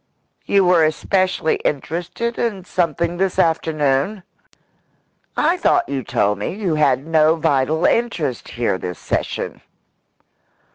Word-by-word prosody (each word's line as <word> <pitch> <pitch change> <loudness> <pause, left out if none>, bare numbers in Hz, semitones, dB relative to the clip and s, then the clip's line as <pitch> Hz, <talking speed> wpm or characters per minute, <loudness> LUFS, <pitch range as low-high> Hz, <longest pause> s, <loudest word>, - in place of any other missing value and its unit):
"You 195 -2 +4
were 175 -2 +5
especially 185 +2 +1
interested 175 - -3
in 205 -6 -2
something 170 -1 -1
this 190 0 0
afternoon? 160 +3 +1 1.1
I 335 +4 +2
thought 355 - +2
you 140 -1 -2
told 105 -4 0
me - - -3
you 195 -6 -1
had 140 -3 +2
no 160 0 +3
vital 160 0 +1
interest 170 - 0
here 115 -5 -1
this 90 -1 -5
session." - - -3
160 Hz, 115 wpm, -20 LUFS, 140-185 Hz, 1.1 s, were